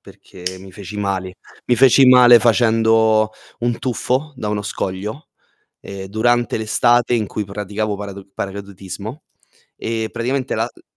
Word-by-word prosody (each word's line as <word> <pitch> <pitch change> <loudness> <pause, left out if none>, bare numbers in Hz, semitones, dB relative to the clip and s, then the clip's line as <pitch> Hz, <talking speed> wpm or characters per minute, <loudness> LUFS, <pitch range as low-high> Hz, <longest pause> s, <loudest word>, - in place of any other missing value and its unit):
perché 90 0 -9
mi 95 0 -12
feci 100 +2 -9
male. 95 -2 -3 0.3
Mi 125 - +3
feci 135 +1 +6
male 125 -1 +8
facendo 110 -1 +3 0.3
un 120 -1 -1
tuffo 130 +4 -1
da 105 -4 -4
uno 105 -1 -2
scoglio, 100 +7 -5 0.5
ehm, 95 -1 -8
durante 120 +3 +1
l'estate 120 +2 +2
in 110 -3 0
cui 105 - -3
praticavo 105 +1 -3
paradu 100 -1 -8
paracadutismo. 100 - -7 0.5
E 110 -1 -3
praticamente 130 +3 -2
la, - - 0
uhm - - -20
110 Hz, 135 wpm, -19 LUFS, 100-120 Hz, 0.5 s, male